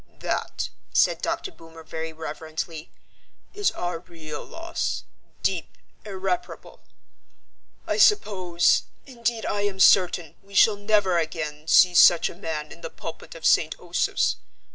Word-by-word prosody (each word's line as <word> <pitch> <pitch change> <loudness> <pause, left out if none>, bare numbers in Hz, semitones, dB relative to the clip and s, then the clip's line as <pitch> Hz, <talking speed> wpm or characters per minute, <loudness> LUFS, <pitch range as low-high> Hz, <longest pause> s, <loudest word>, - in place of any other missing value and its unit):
"That," - - -2 0.2
said - - +3
Dr. 385 - -2
Boomer 165 - -14
very 160 0 -5
reverently, 160 +1 -6 0.6
"is 410 0 +1
our 175 -1 -3
real 165 -3 -9
loss, 330 +1 -4 0.4
deep, - - -2 0.3
irreparable. 190 -3 -5 1.0
I - - -1
suppose, 185 - +3 0.2
indeed 235 -3 -3
I 205 - -1
am 200 -2 -2
certain, 180 -4 +4
we 200 0 -15
shall 215 +1 +6
never 205 -3 +2
again 155 -1 -4
see 180 +2 +6
such 170 -1 +6
a - - -13
man 160 -4 -5
in 170 - -12
the 165 - -6
pulpit 165 +1 -9
of 160 -1 -8
St. 160 0 +3
Osoph's. 175 0 0
175 Hz, 130 wpm, -25 LUFS, 160-200 Hz, 1.0 s, shall